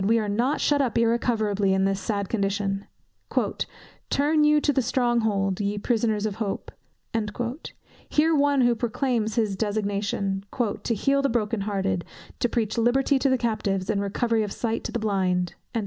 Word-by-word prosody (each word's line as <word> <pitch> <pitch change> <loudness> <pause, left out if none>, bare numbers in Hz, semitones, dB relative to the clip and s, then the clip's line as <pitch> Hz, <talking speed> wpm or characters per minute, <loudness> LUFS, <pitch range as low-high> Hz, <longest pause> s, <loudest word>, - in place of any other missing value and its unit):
we 225 +4 +3
are 215 -2 0
not 240 +8 +1
shut 290 -1 +2
up 255 -4 0
irrecoverably 220 -4 +2
in 190 0 +2
this 195 0 0
sad 200 -1 -2
condition: 200 -1 -1 1.2
"Turn 300 +2 +3
you 300 0 +5
to 295 0 +1
the 265 - +2
strong 240 -1 +1
hold, 195 -4 0
ye 205 0 -1
prisoners 220 -1 0
of 205 -2 -3
hope;" 210 -3 -3 1.4
hear 320 +2 +3
one 285 -1 +3
who 240 -1 +4
proclaims 230 -1 -1
his 215 -4 +1
designation, 200 -2 -1 0.4
"to 230 - 0
heal 275 +6 +2
the 275 - +1
broken 225 -2 0
hearted, 195 -3 -1 0.4
to 240 - +1
preach 225 -1 -1
liberty 265 +4 +3
to 275 - +2
the 260 - +3
captives, 210 -5 -1
and 200 -2 0
recovering 220 +3 0
of 205 - -4
sight 230 +1 -2
to - - -3
the - - -1
blind." 185 -5 0
220 Hz, 165 wpm, -25 LUFS, 200-245 Hz, 1.4 s, you